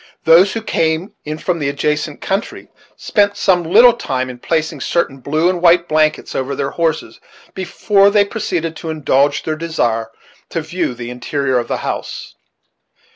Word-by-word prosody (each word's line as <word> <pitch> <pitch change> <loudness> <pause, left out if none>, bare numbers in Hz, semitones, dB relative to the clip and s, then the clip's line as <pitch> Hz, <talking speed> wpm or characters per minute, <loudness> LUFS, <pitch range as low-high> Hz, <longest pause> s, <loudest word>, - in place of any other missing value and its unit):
Those 175 +4 +6
who 225 - -4
came 160 -1 -1
in 155 +1 -4
from 170 +1 -2
the 145 -2 -1
adjacent 150 +1 -2
country 195 +3 -3 0.3
spent 205 -2 +1
some 180 -3 +3
little 225 +9 +6
time 130 - -3
in 125 - -12
placing 155 0 -2
certain 135 -4 -1
blue 155 +6 0
and 180 -1 0
white 170 0 +4
blankets 155 0 +1
over 135 +1 -2
their 135 +1 -2
horses 165 -2 -2 0.3
before 195 +2 +2
they 205 0 +3
proceeded 175 -6 -3
to 165 - -6
indulge 145 -2 +1
their 155 - -2
desire 120 -9 -1 0.4
to 165 - -2
view 160 -4 -3
the 120 0 -7
interior 130 +1 -1
of 120 - -4
the - - -2
house. - - -5
160 Hz, 165 wpm, -17 LUFS, 140-180 Hz, 0.4 s, Those